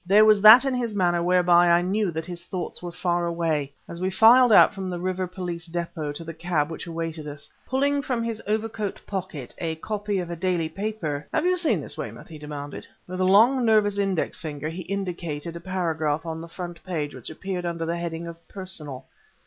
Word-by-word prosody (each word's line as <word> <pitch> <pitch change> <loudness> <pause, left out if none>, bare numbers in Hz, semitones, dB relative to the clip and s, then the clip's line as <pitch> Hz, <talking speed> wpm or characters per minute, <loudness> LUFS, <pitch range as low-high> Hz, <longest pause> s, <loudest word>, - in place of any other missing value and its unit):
There 200 +4 +6
was 215 -2 +5
that 220 +6 +10
in 270 - +1
his 235 -4 -2
manner 175 -3 +2
whereby 175 0 +4
I 170 +1 +4
knew 200 +2 0
that 160 -1 -4
his 175 -1 -7
thoughts 175 -1 -5
were 175 -1 -5
far 175 0 0
away, 160 -4 -1 0.2
as 170 +1 -8
we 185 - +1
filed 235 +5 +6
out 210 - +7
from 190 -2 -5
the 180 - -3
River 185 +1 -2
Police 175 -2 -6
Depôt 165 -3 -3
to 165 - -6
the 165 0 -7
cab 160 -2 -1
which 165 - -7
awaited 165 -2 -4
us. 145 0 -9 0.2
Pulling 280 +2 +1
from 250 -4 -2
his 225 -1 -3
overcoat 215 -1 -2
pocket 185 -9 -5
a 165 -2 -2
copy 205 +4 -3
of 175 -2 -3
a - - -3
daily 170 -2 0
paper 160 -6 -4
"Have - - 0
you 365 0 +3
seen 345 -3 +1
this, - - -7
Weymouth?" - - -7
he 155 -2 -10
demanded. 145 -1 -7 0.2
With 185 +1 -6
a - - +3
long, 230 +7 +5
nervous 210 -3 +3
index 195 -4 -1
finger 150 -1 -4
he 170 +3 -6
indicated 170 -4 -4
a - - -5
paragraph 160 -4 -1
on 160 0 -4
the 165 - -8
front 175 -1 -8
page 155 -6 -3
which - - -5
appeared 180 +2 -4
under 170 -1 -3
the 170 +1 -2
heading 170 -1 -4
of 170 0 -8
"Personal." 155 -9 -6
175 Hz, 215 wpm, -25 LUFS, 165-200 Hz, 0.2 s, that